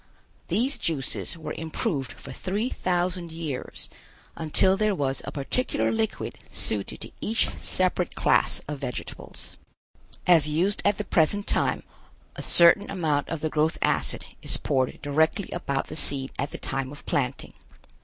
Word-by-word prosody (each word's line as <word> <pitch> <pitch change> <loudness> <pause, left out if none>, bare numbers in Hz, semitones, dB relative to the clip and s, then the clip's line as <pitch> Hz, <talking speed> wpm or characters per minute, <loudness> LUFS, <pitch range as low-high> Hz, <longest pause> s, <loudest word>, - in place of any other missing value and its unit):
These 255 +6 +1
juices 155 +1 -2
were 155 -2 -5
improved 160 - -2
for - - -10
three 205 +6 -2
thousand 180 -3 -1
years 160 -5 -5 0.5
until 165 +4 +3
there 215 0 +2
was 135 -4 0
a - - -4
particular 150 - 0
liquid 220 -1 -2
suited - - -3
to - - -6
each 220 +2 +2
separate 185 -1 0
class - - +3
of 145 -1 -4
vegetables. 125 -3 -6 0.7
As 165 -4 +6
used 180 +7 +1
at 205 -1 +3
the - - -1
present 200 +5 +2
time, - - +1 0.5
a - - -5
certain 175 +4 +6
amount 155 -7 0
of 165 -2 -3
the 155 - 0
growth 155 +2 +2
acid 70 -5 +1 0.2
is - - -2
poured 130 -2 0
directly 160 +7 +1
about 140 -6 -1
the 155 - -7
seed 135 -3 -1
at 140 - 0
the - - -6
time 135 0 -2
of 145 - -11
planting. 130 -2 -1
160 Hz, 150 wpm, -26 LUFS, 140-185 Hz, 0.7 s, As